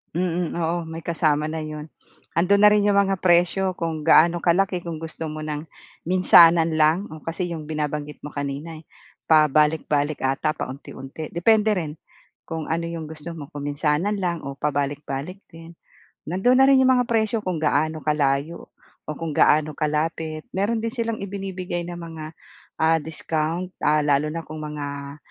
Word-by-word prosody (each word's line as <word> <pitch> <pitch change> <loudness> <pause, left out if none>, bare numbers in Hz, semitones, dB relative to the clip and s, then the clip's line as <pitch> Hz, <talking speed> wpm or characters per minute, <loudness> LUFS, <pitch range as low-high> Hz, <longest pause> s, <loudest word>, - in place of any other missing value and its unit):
Mm, 175 -1 -1
oo, 170 0 -1
may 160 +1 -7
kasama 155 -2 0
na 160 - -4
'yon. 155 0 -7 0.5
Andoon 200 +4 +4
na 210 - +9
rin 210 -1 +3
yung 200 -1 +3
mga 195 -1 +2
presyo 180 +2 +2
kung 160 -3 -4
gaano 170 +2 +6
kalaki, 180 +3 +2
kung 160 -2 -5
gusto 160 0 -6
mo 155 0 -5
ng 150 0 -4 0.4
minsanan 170 -2 +6
lang. 160 +5 +2
Oo, 155 0 -10
kasi 175 +2 -3
yung 160 -3 -5
binabanggit 150 -1 -4
mo 150 - -7
kanina 145 +3 -5
eh 155 - -15 0.4
pabalik-balik 150 -1 +3
'ata, 135 +3 0
paunti-unti. 135 +3 -8
Depende 215 +4 +3
rin 160 -5 -4 0.5
kung 160 -1 -5
ano 165 +1 -1
yung 165 -2 -6
gusto 160 +2 -8
mo, 150 -3 -9
kung 145 -4 -7
minsanan 150 +8 0
lang 170 -4 -2
o 140 - -4
pabalik-balik 145 +4 -3
din. 165 +1 -12 0.5
Nandoon 190 +10 +2
na 265 - +7
rin 270 -1 +6
yung 260 - +4
mga 250 - +2
presyo 220 -1 +1
kung 175 -4 -2
gaano 155 +1 +1
kalayo 150 +1 -1 0.4
o 155 - -4
kung 160 0 -5
gaano 150 0 +3
kalapit. 155 0 -2
Mayroon 215 +4 0
din 230 - -1
silang 230 -2 -3
ibinibigay 185 -3 -4
na 175 0 -6
mga, 160 -2 -8 0.5
ah, 160 0 +4
discount, 160 +3 -3
ah, 150 +1 +3
lalo 145 +1 +2
na 165 - -3
kung 155 - -8
mga, 145 -1 -6
160 Hz, 165 wpm, -23 LUFS, 150-180 Hz, 0.5 s, na